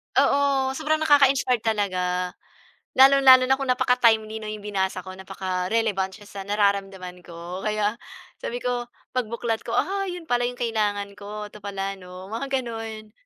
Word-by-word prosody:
Oo, 275 -2 +3
sobrang 310 0 0
nakaka-inspire 275 -4 +4
talaga. 185 -5 -1 0.7
Lalong-lalo 265 -1 +8
na 265 +1 +3
kung 270 -1 -4
napaka-timely, 225 -3 +2
'no, 215 - -5
'yong 210 -1 -7
binasa 190 -2 -2
ko 185 - -7
napaka-relevant 190 +1 -2
siya 205 - -15
sa 200 - -7
nararamdaman 195 -3 -1
ko, 175 +2 -8
kaya 210 0 0 0.5
sabi 240 - -3
ko 245 -1 -2 0.2
pagbuklat 235 -2 -2
ko. - - -6
"Ah, 390 0 0
'yon 355 -2 -7
pala 245 -4 +1
'yong 245 - -9
kailangan 205 -3 -1
ko, 210 +1 -7
'to 210 - -12
pala, 195 -1 -3
'no?" 180 0 -11
Mga 230 +6 -4
gano'n. 225 -3 -7
215 Hz, 150 wpm, -24 LUFS, 195-250 Hz, 0.7 s, Lalong-lalo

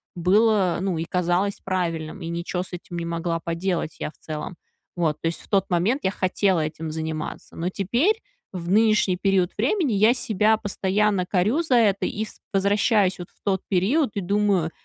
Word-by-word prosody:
было, 195 0 +3
ну 190 -4 -1
и 165 - -2
казалось 180 +3 0
правильным, 170 -2 -2
и 165 - -5
ничё 170 +1 -3
с 185 - -14
этим 175 0 -7
не 170 - -3
могла 170 0 -2
поделать 170 -1 -2
я - - -3
в - - -31
целом. 155 +3 -6 0.4
Вот. 155 -3 0
То 165 - 0
есть 165 - -3
в - - -18
тот 200 -1 +1
момент 200 +11 +1
я 190 - +1
хотела 185 -2 +1
этим 155 +1 -4
заниматься. 160 -1 -5
Но 170 +2 -2
теперь, 240 - +1 0.3
в 175 -3 -6
нынешний 215 -2 +4
период 190 -2 +2
времени, 275 - +1
я 215 +4 +5
себя 220 -1 +2
постоянно 200 -1 0
корю 210 - +2
за 260 -6 +2
это 205 -4 +3
и 215 +1 -3
с - - -12
возвращаюсь 200 -1 +2
вот 175 - -8
в - - -35
тот 190 -2 +1
период 215 - +2
и 200 - -1
думаю, 195 -3 +1
190 Hz, 185 wpm, -24 LUFS, 170-210 Hz, 0.4 s, я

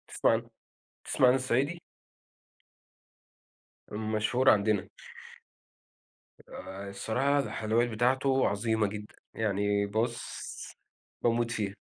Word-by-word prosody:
بتسمع - - +2
عن - - 0 0.6
بتسمع 130 - +3
عن 125 - +6
الصعيدي؟ 135 +6 0 2.1
مشهور 110 +4 +1
عندنا. 105 -1 +3 1.6
آآ 95 +2 -8
الصراحة 125 +8 0
الحلويات 115 -2 0
بتاعته 130 +4 +2
عظيمة 110 +1 +1
جدًا، 105 +1 -8 0.2
يعني 100 -1 0
بُصّ 115 +4 -4 0.5
باموت 120 0 +2
فيها. 105 -4 -2
110 Hz, 85 wpm, -29 LUFS, 105-125 Hz, 2.1 s, عن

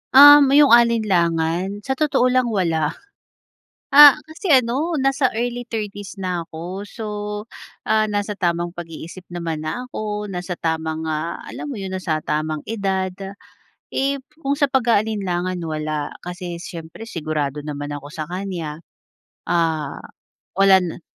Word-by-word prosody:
Um, 290 +1 +10
iyong 290 -3 +7
alinlangan? 190 -5 +2
Sa 265 - -3
totoo 265 -2 +2
lang 255 -1 +2
wala. 165 -8 0 0.9
Ah, 290 0 +10
kasi 315 +2 -1
ano 265 +7 +2
nasa 270 -1 +2
early 240 +2 -2
30's 205 -4 -5
na 180 -3 -2
ako. 175 +5 -7
So, 225 +2 -9 0.9
ah, 215 0 +4
nasa 205 -1 -2
tamang 175 -1 0
pag-iisip 170 +1 -9
naman 165 -3 -4
na 250 +10 -4
ako, 210 -2 -4
nasa 180 -1 -4
tamang, 160 -1 -2
ah, 155 +2 -3
alam - - -7
mo 290 - -5
iyon 195 -5 -5
nasa 160 -4 -2
tamang 155 0 -2
edad. 195 -4 -1 0.9
Eh, 275 +1 0 0.2
kung 275 +1 0
sa 290 - +4
pag-aalinlangan 205 -8 0
wala, 155 -2 -3
kasi 180 -1 -6
siyempre 170 +5 -9
sigurado 150 -5 -3
naman 145 -1 -5
ako 145 0 -8
sa 155 0 -5
kanya. 175 -4 -5 0.7
Ah, 160 -4 0 0.6
walan 190 -3 +4
185 Hz, 130 wpm, -21 LUFS, 160-235 Hz, 0.9 s, Um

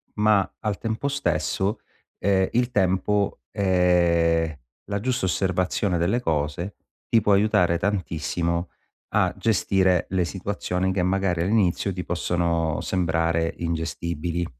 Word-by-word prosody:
ma 105 -2 +3
al 105 -3 -2
tempo 115 +4 -2
stesso, 100 - -1 0.4
ehm, 95 -1 +2
il 125 +1 +1
tempo, 100 0 +1
ehm, 85 -4 +2 0.3
la 100 0 -2
giusta 125 -2 -1
osservazione 90 0 0
delle 95 +9 +1
cose, 80 +2 -2 0.3
ti 115 - +3
può 105 0 +3
aiutare 100 -4 +3
tantissimo 85 -2 -1 0.4
a - - +2
gestire 95 -4 +2
le 95 -1 +1
situazioni 95 0 -2
che 95 - 0
magari 90 -2 +1
all'inizio 100 0 +1
ti 90 0 -4
possono 85 -2 0
sembrare 85 -2 0
ingestibili. 85 0 -3
90 Hz, 115 wpm, -24 LUFS, 85-100 Hz, 0.4 s, ma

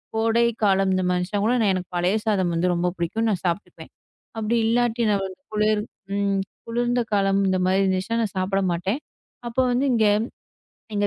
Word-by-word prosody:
கோடை 225 +1 +2 0.2
காலம் 195 -1 +3
இந்த 185 0 +1
மனுஷங்கூட 200 +6 0 0.2
எனக்கு 185 -1 -4
பழைய 180 +5 +2
சாதம் 190 -5 +1 0.2
ரொம்ப 175 +1 +1
புடிக்கும். 220 +7 -1
நான் 190 -4 -1
சாப்பிட்டுக்குவேன். 175 +4 -4 0.5
அப்பிடி 225 +2 0
இல்லாட்டி 240 0 +1
நான் 200 -2 +1
ஒரு 185 - -10 0.2
குளிர் 215 0 +2 0.3
ம் 200 -1 +1 0.3
குளிர்ந்த 240 +1 0
காலம். 195 -1 +2
இந்தமாரி 185 0 +2
இருந்துச்சுனா. 190 +4 0
நான் 205 - -3
சாப்பிட 195 +1 0
மாட்டேன். 190 - -1 0.5
அப்போ 240 +2 0
வந்து 255 +3 +1
இங்க 220 -2 +3 0.9
எங்க 205 0 +1
200 Hz, 150 wpm, -23 LUFS, 185-225 Hz, 0.9 s, காலம்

